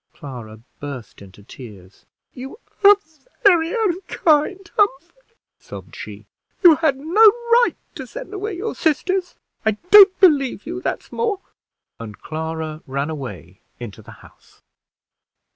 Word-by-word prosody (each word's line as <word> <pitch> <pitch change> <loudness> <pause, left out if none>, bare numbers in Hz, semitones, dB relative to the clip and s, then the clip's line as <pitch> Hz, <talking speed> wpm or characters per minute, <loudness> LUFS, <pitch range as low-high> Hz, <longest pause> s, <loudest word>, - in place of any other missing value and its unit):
Clara 120 -6 -10 0.2
burst 140 -8 -9
into 100 +1 -15
tears. 100 -5 -14 0.3
"You 265 +9 -9 0.3
are 405 +1 +9 0.5
very 340 -4 +4
unkind, 360 -4 0
Humphrey," 410 - -2 0.2
sobbed - - -11
she. - - -10 0.4
"You 330 -4 +8
had 310 -5 +1
no 330 +10 +2
right 475 +2 +3 0.2
to - - -8
send - - -9
away 405 -1 -5
your 435 +5 -4
sisters. 360 +4 -1 0.3
I 220 - +2 0.2
don't 400 -2 +8
believe 280 - +3
you 350 +5 -6
that's - - -4
more!" 430 -4 -2 0.6
and 110 -3 -9
Clara 160 0 -5
ran 140 +3 -3
away 100 - -9 0.2
into 115 -5 -9
the - - -17 0.2
house. - - -23
305 Hz, 125 wpm, -20 LUFS, -, 0.6 s, are